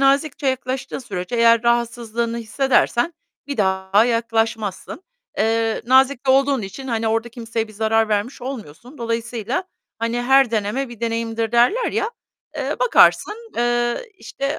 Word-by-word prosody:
nazikçe 275 +1 +2
yaklaştığın 260 0 -2
sürece 195 -3 -5
eğer 230 0 +5
rahatsızlığını 235 -1 0
hissedersen 255 +5 +1 0.3
bir 285 -1 -4
daha 190 +1 +2
yaklaşmazsın. 225 - -1 0.4
Eee, 225 +1 +1
nazik 265 +1 +3
de 260 - +5
olduğun 275 -2 +3
için, 205 +8 -7
hani, 225 -1 0
orada 225 +1 0
kimseye 230 -1 -4
bir 215 - -13
zarar 220 +1 +1
vermiş 215 +5 -2
olmuyorsun. 245 - -8
Dolayısıyla, 230 - -3 0.3
hani, 230 +2 -1
her 265 0 +4
deneme 225 +5 -1
bir 240 -2 -12
deneyimdir 230 -1 -2
derler 245 - +3
ya, 435 - -1 0.5
eee, - - -2
bakarsın, 460 -2 +3
eee, 240 - 0
işte, 275 +2 -4
235 Hz, 135 wpm, -21 LUFS, 225-265 Hz, 0.5 s, eğer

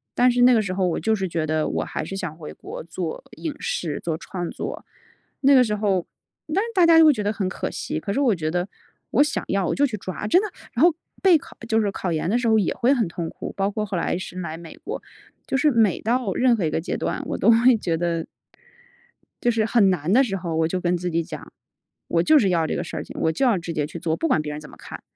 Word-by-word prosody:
但 250 0 +5
是 245 0 +1
那 250 0 +7
个 220 - +3
时 185 -2 -3
候 185 -1 +1
我 170 - -1
就 220 - +1
是 195 -3 -1
觉 165 -2 -2
得 155 0 0
我 - - -1
还 - - -4
是 195 - -6
想 175 -5 -4
回 160 -2 -9
国 - - -9
做 170 +3 -5
影 315 -3 -4
视、 155 -5 -3
做 165 -2 -2
创 175 +1 -5
作。 - - -6 0.6
那 280 0 +5
个 255 -2 +7
时 210 -3 -1
候， 200 -4 0 0.4
当 - - -1
时 465 - -4
大 370 -4 +4
家 330 -1 +7
都 325 - +8
会 305 - +7
觉 215 - -3
得 205 0 0
很 200 -3 -2
可 185 - -3
惜， - - -4
可 200 - -4
是 235 - 0
我 260 -6 +3
觉 155 -2 -2
得 175 +3 -1 0.4
我 265 - +4
想 300 - -2
要 195 -2 +1
我 - - 0
就 285 - +3
去 250 -6 -3
抓， 185 +1 -6
真 355 - +5
的， 425 - -3 0.2
然 250 - +2
后 345 - +7 0.3
备 370 -4 +6
考 290 - -14
就 225 -1 +2
是 205 -2 0
考 185 -2 -3
研 160 0 -1
的 225 +6 +2
时 240 - -1
候 220 -1 +4
也 200 -5 +1
会 250 +2 +2
很 240 -8 +2
痛 165 -1 -5
苦， - - -7
包 195 0 0
括 210 +1 -2
后 195 - -4
来 175 - -1
是 185 0 -7
来 165 -3 -5
美 165 -1 -11
国， - - -6 0.4
就 - - -2
是 280 +3 +4
每 225 -7 +2
到 235 -3 0
任 250 +2 +3
何 200 -7 -1
一 155 - -1
个 - - -1
阶 - - -3
段， - - -2
我 - - -2
都 - - +5
会 235 +1 +5
觉 175 -6 -1
得 170 -1 -1 1.2
就 240 - +3
是 225 -2 +1
很 215 -2 +4
难 175 -1 -1
的 255 +5 +6
时 200 -6 -2
候， 175 -3 -4
我 160 0 +2
就 185 +2 -2
跟 180 0 +1
自 180 +1 -3
己 165 0 0
讲， 155 -3 -9 0.6
我 165 - +2
就 305 - +6
是 205 - +2
要 170 -3 +2
这 - - -2
个 - - -2
事 - - -7
儿 - - -4
情， - - -10
我 160 - +2
就 165 - 0
要 235 -7 +3
直 170 0 -5
接 150 -2 -1
去 165 - -8
做， 160 -1 -1
不 165 - -1
管 - - +3
别 150 -1 -5
人 150 - -6
怎 150 - -12
么 - - -14
看。 - - -10
195 Hz, 305 characters per minute, -23 LUFS, 170-240 Hz, 1.2 s, 都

